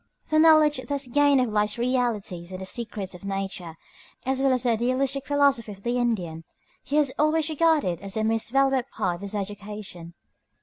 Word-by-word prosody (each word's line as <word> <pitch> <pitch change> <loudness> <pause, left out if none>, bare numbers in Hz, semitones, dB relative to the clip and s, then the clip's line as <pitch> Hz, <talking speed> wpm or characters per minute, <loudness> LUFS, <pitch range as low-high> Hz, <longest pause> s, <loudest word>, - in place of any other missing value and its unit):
The 310 - +3
knowledge 310 -3 +6
thus 285 -1 -1
gained 285 +1 +3
of 250 - 0
life's 210 +1 0
realities 235 -8 -1
and 185 - -6
the 190 - -6
secrets 210 -3 -3
of 180 - -12
nature, 195 -4 -4 0.5
as 265 0 0
well 270 -1 +3
as 255 -1 +1
of - - -10
the 245 - +1
idealistic 260 +4 0
philosophy 280 -6 +2
of 195 0 -16
the 240 +1 0
Indian, 180 -10 -2 0.4
he 285 - -3
has 295 -3 +3
always 310 +1 +2
regarded 305 - +2
as 195 +1 -5
a 215 - 0
most 225 +1 0
valuable 270 0 +2
part 175 -1 -2
of - - -16
his 200 +1 -5
education. 200 -4 -6
235 Hz, 190 wpm, -25 LUFS, 195-275 Hz, 0.5 s, knowledge